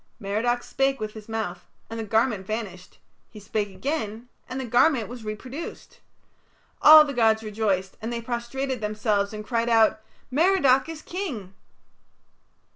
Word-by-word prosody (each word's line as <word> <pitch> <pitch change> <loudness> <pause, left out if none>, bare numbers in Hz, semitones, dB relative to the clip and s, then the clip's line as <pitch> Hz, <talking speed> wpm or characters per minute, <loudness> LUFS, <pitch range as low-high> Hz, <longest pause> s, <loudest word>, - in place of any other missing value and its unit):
Merodach 235 +4 -1
spake 270 0 0
with 215 -1 -4
his 215 0 -11
mouth 205 -6 -4 0.2
and 225 0 -6
the - - -2
garment 220 -2 0
vanished; 205 -5 -6 0.3
he 215 - -12
spake 205 0 -2
again 235 0 -4 0.2
and 255 - -4
the 260 - -3
garment 245 0 +3
was 240 -1 -9
reproduced. 255 +9 -7 0.8
All 310 0 +10
the 285 - -4
gods 225 -2 +3
rejoiced, 205 -3 -1
and 225 +2 -4
they 235 - -2
prostrated 240 +2 -3
themselves 210 -1 0
and 215 -1 -7
cried 230 0 0
out, 220 -1 +4 0.3
"Merodach 290 -3 +3
is 320 -1 -7
King!" 270 - -5
225 Hz, 145 wpm, -25 LUFS, 215-260 Hz, 0.8 s, All